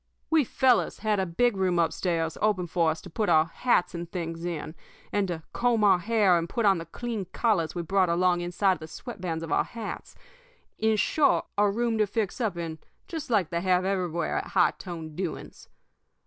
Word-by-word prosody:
We 320 -2 +5
fellows 255 +1 +2
had 215 -2 +1
a 190 - 0
big 235 +7 +1
room 185 -2 +1
up 165 -2 +2
stairs 165 -3 -1
opened 195 -5 +1
up - - -25
for 170 -2 +2
us 160 0 -3
to 185 - -11
put 210 +5 -1
our 155 0 +5
hats 180 +3 +1
and 170 -1 -6
things 165 -2 -4
in, 160 -3 -4 0.4
and 205 -1 +1
to 165 -3 -4
comb 235 -3 +2
our 195 -3 +5
hair 200 -3 +3
and 165 0 -4
put 230 - -1
on 195 -3 +4
the 165 - -8
clean 225 +2 -4
collars 185 -4 0
we 175 - -2
brought 185 +1 +2
along 175 +1 +2
inside 180 +2 +1
the 155 - -8
sweat 230 +5 -9
bands 165 -3 -3
of 165 - -6
our - - +3
hats 230 -3 -7 0.6
in 220 0 +3
short, 285 +7 +2
a 205 0 +3
room 230 +2 0
to 215 - +3
fix 210 +3 -2
up 210 -6 -1
in 165 -2 -5 0.3
just 320 -6 -6
like 200 -8 +1
they 170 0 -1
have 185 0 +2
everywhere 180 -4 -1
at - - -6
high 180 -2 +3
toned 165 -4 -7
doings. 180 -1 -6
185 Hz, 210 wpm, -27 LUFS, 170-215 Hz, 0.6 s, We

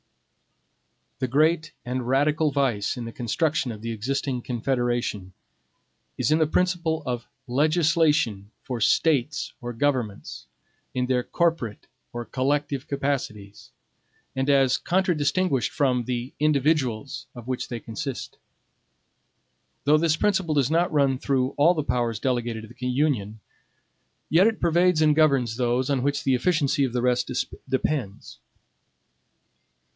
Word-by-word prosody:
The 130 - 0
great 155 +4 +2
and 125 0 -3
radical 150 +4 +2
vice 130 -6 0
in 120 - -5
the 115 - -6
construction 135 +4 -1
of 110 -1 -9
the 115 - -3
existing 125 +3 -2
Confederation 120 -6 -2 0.8
is - - 0
in 155 - +4
the 155 - +3
principle 170 -2 0
of 120 -2 -3 0.2
LEGISLATION 150 - +2
for 125 -3 -4
STATES 145 +3 +1
or 120 0 -5
GOVERNMENTS, 120 -5 -2 0.5
in 125 0 +1
their 125 -1 +1
CORPORATE 160 - -1 0.3
or 120 0 -5
COLLECTIVE 140 +1 -1
CAPACITIES, 125 -8 -3 0.7
and 135 +1 0
as 135 -3 +4
contradistinguished 175 - +1
from 125 -4 +1
the 125 +1 -3
INDIVIDUALS 140 -4 0
of 120 -1 -10
which 130 -1 -3
they 120 - -5
consist. 130 +5 -6 1.4
Though 150 +2 +4
this 160 -1 +2
principle 190 -6 +1
does 140 -1 +2
not 170 +2 +2
run 140 -4 +2
through 130 -3 +1
all 165 +5 +3
the 155 - -1
powers 120 -5 -1
delegated 120 -3 -1
to - - -9
the 125 - -5
Union, 125 -6 0 0.9
yet 180 +6 +5
it 225 -1 -1
pervades 170 -1 +3
and 150 -1 +4
governs 135 -7 +2
those 125 +2 0
on 135 -2 +1
which 145 +3 -1
the 135 - +2
efficacy 145 0 +1
of 130 -3 -1
the 125 -1 -1
rest 125 -1 +1 0.4
depends. 110 - -2
135 Hz, 130 wpm, -25 LUFS, 120-155 Hz, 1.4 s, yet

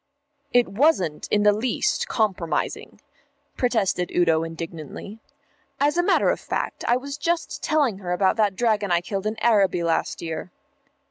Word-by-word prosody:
"It 245 -1 +4
wasn't 195 - +1
in 205 0 +2
the 210 0 +5
least 230 +3 0
compromising," 190 -7 -2 0.6
protested 200 -8 0
Udo 165 -2 +2
indignantly. 165 +5 -7 0.6
"As 290 +2 +2
a 350 - +3
matter 350 - +3
of - - -3
fact - - -4
I 240 - +4
was 280 +2 -7
just 340 0 -2
telling 285 -11 +1
her 180 -3 -5
about 190 +1 +2
that 210 -3 +2
dragon 215 -3 +1
I 170 0 +3
killed 195 +2 -3
in 215 +1 -3
Araby 195 -6 +3
last 165 -1 0
year." 165 +1 -5
205 Hz, 150 wpm, -24 LUFS, 175-240 Hz, 0.6 s, the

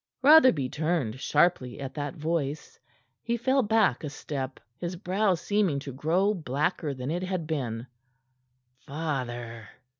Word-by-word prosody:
Rotherby 260 - +7
turned 150 -7 -1
sharply 135 -5 +1
at 135 -1 -5
that 145 -2 -4
voice. 155 -2 -3 0.4
He 235 0 -1
fell 260 +3 +2
back 210 - +2
a 150 - -3
step, 140 -2 -5 0.2
his 175 +1 -4
brow 190 +1 +1
seeming 190 -3 +1
to 140 0 -5
grow 175 +9 +1
blacker 150 -2 -1
than 130 +3 -4
it 175 +2 -1
had 185 -3 -2
been. 125 -7 -3 0.9
"Father!" 125 -7 -4
155 Hz, 130 wpm, -28 LUFS, 135-185 Hz, 0.9 s, Rotherby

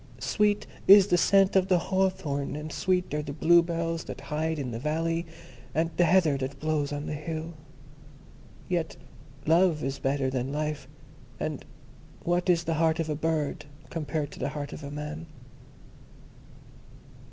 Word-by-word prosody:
Sweet 210 -1 +1 0.2
is 200 0 +10
the 180 -3 +2
scent 195 +2 +4
of 190 -1 +4
the 185 - +4
hawthorn, 185 -6 -1
and 150 +1 -6
sweet 180 -3 0
are 150 - 0
the 145 -1 -6
bluebells 165 +1 +2
that - - -7
hide 160 +1 0
in 135 -4 -3
the 115 - -4
valley, 165 +4 -1 0.5
and 165 +2 +1
the 175 - +4
heather 170 -6 +4
that 135 +1 -4
blows 155 -2 0
on 145 0 -4
the - - -3
hill. 160 +2 -5 1.1
Yet 170 -4 -2 0.5
Love 165 -1 +3
is 135 +1 -3
better 135 -1 0
than 130 0 -2
Life, 150 -2 -3 0.5
and 155 -3 -3 0.6
what 175 +1 0
is 170 -1 +4
the 165 - -1
heart 160 0 +2
of 160 -1 -1
a - - 0
bird 155 -1 -1 0.3
compared 155 -2 -3
to - - -11
the - - -1
heart 145 -1 -5
of - - -8
a 140 - -5
man?" 150 +3 -6
160 Hz, 160 wpm, -28 LUFS, 145-170 Hz, 1.1 s, is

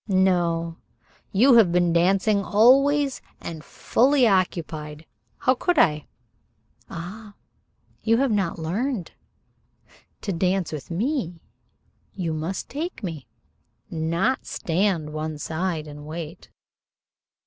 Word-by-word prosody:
"No. 175 -4 +1 0.5
You 240 +5 +6
have 205 -7 +6
been 175 -1 +2
dancing 195 +4 +3
always, 275 +6 +4 0.2
and 160 -2 -7
fully 260 - +2
occupied. 160 -5 -1 0.3
How 255 - +3
could 350 +6 0
I?" 150 - +3 0.8
"Ah, 205 +5 -8 0.7
you 225 0 +3
have 270 -1 +2
not 195 -5 0
learned. 190 - -2 1.1
To 200 - -3
dance 185 +1 0
with 150 -4 -7
me 185 - -2 0.8
you 170 -4 -2
must 160 +5 -4
take 310 - -5
me, 160 -7 -5 0.6
not 170 +10 0
stand 170 -3 -1
one 155 0 -4
side 160 +1 -3
and 150 0 -10
wait." 160 +1 -7
180 Hz, 105 wpm, -24 LUFS, 165-225 Hz, 1.1 s, You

